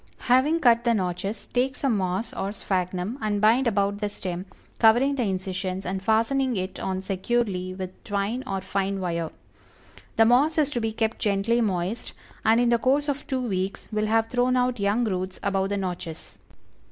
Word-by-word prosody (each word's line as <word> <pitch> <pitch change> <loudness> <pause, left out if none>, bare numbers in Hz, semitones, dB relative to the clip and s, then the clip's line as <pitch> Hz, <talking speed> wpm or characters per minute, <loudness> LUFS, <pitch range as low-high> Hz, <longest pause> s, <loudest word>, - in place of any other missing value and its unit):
Having 275 +7 +3
cut 235 -3 +5
the 235 -1 +3
notches, 190 +2 -3
take 260 +2 0
some 270 -6 0
moss 190 +3 -2
or 195 - -3
sphagnum 185 +3 -2
and 210 -1 0
bind 230 +5 +4
about 200 -2 +1
the 210 -1 -1
stem, 185 -2 -5 0.3
covering 240 +5 +5
the 275 - -1
incisions 190 -2 -2
and 190 +1 -2
fastening 230 +5 +2
it 185 0 -3
on 190 0 -3
securely 190 -2 -1
with 185 -1 -7
twine 205 +4 -2
or 195 -5 -2
fine 195 +1 -1
wire; 170 -3 -2 0.9
the 225 - +5
moss 275 +8 +4
is 295 -2 +2
to 240 - -1
be 225 0 -1
kept 220 0 -1
gently 215 +3 +1
moist, 195 +1 -2 0.3
and 225 +1 +4
in 240 -1 +3
the 235 -1 +3
course 280 +4 +2
of 285 0 -3
two 260 -3 -1
weeks 190 -1 -3
will 215 0 0
have 225 +1 +3
thrown 250 +2 +1
out 250 -1 +1
young 200 +4 +1
roots 185 -3 -2
above 195 -1 0
the 205 - -1
notches. 175 -4 -5
210 Hz, 180 wpm, -25 LUFS, 190-240 Hz, 0.9 s, cut